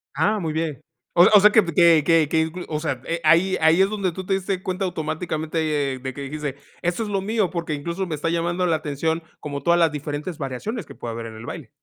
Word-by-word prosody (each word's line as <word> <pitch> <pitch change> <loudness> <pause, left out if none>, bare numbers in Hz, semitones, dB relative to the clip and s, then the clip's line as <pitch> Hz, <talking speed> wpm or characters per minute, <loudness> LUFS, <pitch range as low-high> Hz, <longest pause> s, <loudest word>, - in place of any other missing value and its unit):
Ah, 185 +9 +2
muy 160 -4 -3
bien. 155 -4 -2 0.4
O 175 - +8
s - - +7
o 210 - +10
sea, 210 +2 +6
que 220 0 +5
pe 170 -2 -4
que 170 -2 +6
que 165 -3 +4
que 160 - +2
inclu 160 +3 -4
o 150 - -2
sea, 145 -6 -3
eh, 170 - -2
ahí 170 +5 +4
ahí 160 +3 +5
es 195 - +4
donde 200 -3 -1
tú 185 +3 -6
te 195 - 0
diste 190 -1 -2
cuenta 185 +1 -2
automáticamente, 155 -3 -2
eh, - - -5
de 130 +1 -5
que 140 - -8
dijiste: 145 0 -4 0.3
"Esto 175 +5 0
es 215 - -5
lo 195 -1 0
mío, 210 -1 0
porque 170 -3 -3
incluso 170 +6 -3
me 165 - -4
está 150 +3 -2
llamando 170 +2 0
la 165 - +2
atención 160 +2 -2 0.2
como 145 -1 -5
todas 170 +2 +4
las 165 -2 +4
diferentes 150 +3 -5
variaciones 150 - -4
que - - -12
puede 115 - -6
haber 115 0 -6
en 110 - -10
el 110 - -9
baile". - - -7
165 Hz, 260 wpm, -23 LUFS, 150-185 Hz, 0.4 s, o